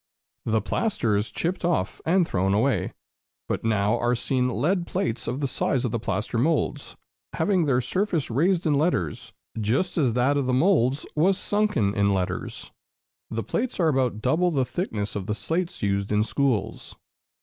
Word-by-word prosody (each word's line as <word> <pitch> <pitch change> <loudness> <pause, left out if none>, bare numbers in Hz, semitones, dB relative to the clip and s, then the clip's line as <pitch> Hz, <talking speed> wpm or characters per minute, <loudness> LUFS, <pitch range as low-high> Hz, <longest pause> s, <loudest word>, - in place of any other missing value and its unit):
The 110 -1 +1
plaster 115 - 0
is 105 +1 0
chipped 175 - -2
off 165 - 0
and 175 0 +3
thrown 95 +1 +1
away; 130 +6 +1 0.6
but - - -2
now 110 +1 +1
are 120 +1 +1
seen 125 +1 0
lead 170 +7 0
plates 180 - -2
of 130 +4 -2
the 140 - +1
size 130 0 -1
of 120 - -1
the 115 - -1
plaster 110 +2 -2
moulds, 155 +4 0 0.4
having 180 0 +1
their 130 -3 +2
surface 165 - -1
raised 170 +8 +2
in 155 - +3
letters, 140 - 0 0.3
just 135 - 0
as 130 -6 +2
that 130 +4 +2
of 140 -3 0
the 130 - +2
moulds 140 -3 +2
was 185 +5 +3
sunken 205 - +1
in 100 -1 +2
letters. 95 -2 -2 0.6
The 115 0 -3
plates 230 - -2
are 165 -3 +4
about 125 -6 0
double 165 +8 +2
the 135 -6 +1
thickness 110 - -3
of 100 -2 -4
the 105 - -1
slates 170 +6 -3
used 100 0 0
in 105 0 +3
schools. 120 -3 -1
130 Hz, 170 wpm, -25 LUFS, 110-170 Hz, 0.6 s, are